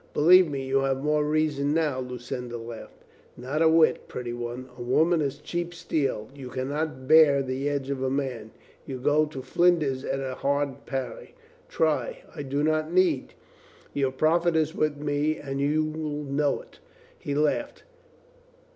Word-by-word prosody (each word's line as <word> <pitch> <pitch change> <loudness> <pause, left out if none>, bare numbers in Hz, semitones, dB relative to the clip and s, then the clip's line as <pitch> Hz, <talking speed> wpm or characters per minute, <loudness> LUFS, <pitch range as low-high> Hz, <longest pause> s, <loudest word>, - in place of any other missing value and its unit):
"Believe 180 +3 +7
me, 135 -2 -3
you 135 +1 +2
have 135 0 0
more 150 0 +2
reason 150 -1 +1
now," 150 -5 +1
Lu 125 -1 -5
cinda 120 0 -5
laughed. 115 -1 -10 0.3
"Not 135 +6 -3
a 160 - +6
whit, 160 0 +3
pretty 120 -1 -5
one. 120 +1 -5
A 125 - -10
woman 160 +7 +2
is 140 -1 -2
cheap 175 +3 -4
steel. 135 -9 -1
You 135 -3 -9
can 130 +1 -3
not 145 -3 -3
bear 150 -3 +6
the 135 +2 -2
edge 140 -1 -2
of 135 -2 -3
a 130 - 0
man. 130 -5 -3 0.4
You 135 - -4
go 150 +4 +2
to 135 -3 -7
flinders 155 -7 +2
at 135 - -2
a 135 -1 -3
hard 140 0 -2
parry." 135 -2 -5 0.3
"Try!" 160 -2 0
"I - - -5
do 140 +1 -2
not 155 +1 +1
need. 175 -7 +2 0.6
Your 135 -2 0
profit 165 +5 +2
is 160 0 +1
with 150 -1 0
me, 145 +1 0
and 135 -1 -4
you'll 155 0 -1
know 145 +1 0
it." - - -20 0.4
He 140 - -3
laughed. 150 +1 0
145 Hz, 170 wpm, -26 LUFS, 130-155 Hz, 0.6 s, Believe